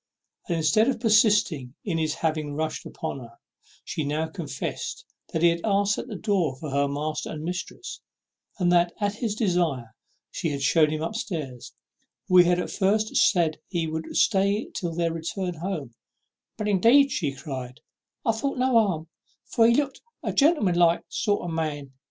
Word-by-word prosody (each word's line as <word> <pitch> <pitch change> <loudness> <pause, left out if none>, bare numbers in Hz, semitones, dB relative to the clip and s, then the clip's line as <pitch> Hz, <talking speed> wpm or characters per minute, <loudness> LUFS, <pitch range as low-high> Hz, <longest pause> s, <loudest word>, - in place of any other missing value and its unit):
And 170 - +1
instead 160 +8 +3
of 250 -3 -1
persisting 210 - +3
in 170 -5 -1
his 155 -1 0
having 155 -3 -2
rushed 155 +1 -3
in - - -8
upon - - -5
her, 115 -2 -12 0.5
she 155 - -3
now 150 +2 -1
confessed 160 -2 -5 0.3
that 160 - -1
he 170 - +7
had 170 0 -1
asked 205 -1 +2
at - - -6
the 220 - -6
door 185 - 0
for 145 +2 -7
her 140 +1 +2
master 150 +2 -3
and 155 -1 -6
mistress; 180 - -5 0.6
and 180 -3 +2
that 175 0 +3
at 205 -1 0
his 220 -3 -2
desire 170 - 0 0.4
she 165 - -2
had 140 -2 -3
shewn 155 +2 +4
him 155 +1 -2
up 165 - -3
stairs, 155 - -5 0.5
where 180 -1 +7
he 175 - +1
at 180 0 0
first 215 +2 +1
said 170 -6 +3
he 170 -3 -1
would 160 0 -4
stay 200 +2 +2
till 170 -4 -3
their 170 -1 0
return 175 +3 -3
home; 165 -7 -5 0.6
"but, 210 - -2
indeed," 235 +8 +5 0.3
cried 130 -4 -6
she, - - -45 0.4
"I 225 - +4
thought 265 +5 -2
no 260 +1 +2
harm, 195 -9 +2 0.4
for 225 -1 +3
he 235 - +4
looked 280 -1 -1 0.2
like - - -2
a - - -13
gentleman 280 - +3
like 170 -1 +4
sort 205 -2 0
of - - -3
man. 150 -4 -3
170 Hz, 180 wpm, -26 LUFS, 155-205 Hz, 0.6 s, he